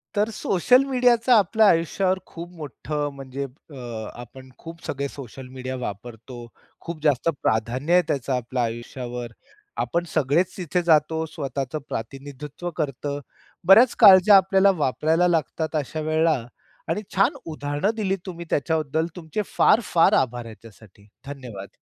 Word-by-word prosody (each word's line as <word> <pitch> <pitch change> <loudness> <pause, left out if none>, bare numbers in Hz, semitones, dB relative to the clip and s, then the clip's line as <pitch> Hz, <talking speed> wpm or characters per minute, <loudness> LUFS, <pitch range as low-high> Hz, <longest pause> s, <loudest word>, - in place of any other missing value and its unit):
तर 210 +2 +1
सोशल 250 +8 +3
मीडियाच 245 -3 +2
आपल्या 220 -1 +5
आयुष्यावर 185 +3 +1
खूप 170 +1 -9
मोठं 150 0 -4
म्हणजे 135 0 -6
अ, 125 -5 -9
आपण 130 +2 -13
खूप 165 0 -11
सगळे 140 0 -3
सोशल 130 -1 -10
मीडिया 130 0 -6
वापरतो. 120 +2 -8 0.3
खूप 170 -2 -7
जास्त 145 0 +2
प्राधान्य 120 +8 0
आहे 180 - +6
त्याचं 135 -1 -1
आपल्या 125 0 -2
आयुष्यावर. 120 +1 -5 0.5
आपण 170 0 -1
सगळेच 155 +4 +1
तिथे 180 -1 -1
जातो, 160 -1 +2
स्वतःच 140 -3 -5
प्रतिनिधित्व 140 +7 -6
करतं. 145 -1 -3 0.5
बऱ्याच 225 +6 +7
काळज्या 200 -1 +8
आपल्याला 195 +1 +4
वापरायला 160 +6 +2
लागतात 160 -1 -1
अशा 155 +1 -2
वेळेला 155 0 +2 0.5
आणि 170 +6 -1
छान 195 - +3
उदाहरणं 145 +4 -2
दिलीत 195 -3 -1
तुम्ही 170 -2 -7
त्याच्याबद्दल 160 +1 0
तुमचे 175 +3 -4 0.2
फार - - +5
फार 165 -1 +5
आभार 120 -1 -6
ह्याच्यासाठी. 110 -2 -15 0.2
धन्यवाद. 125 -9 -8
150 Hz, 130 wpm, -23 LUFS, 130-175 Hz, 0.5 s, काळज्या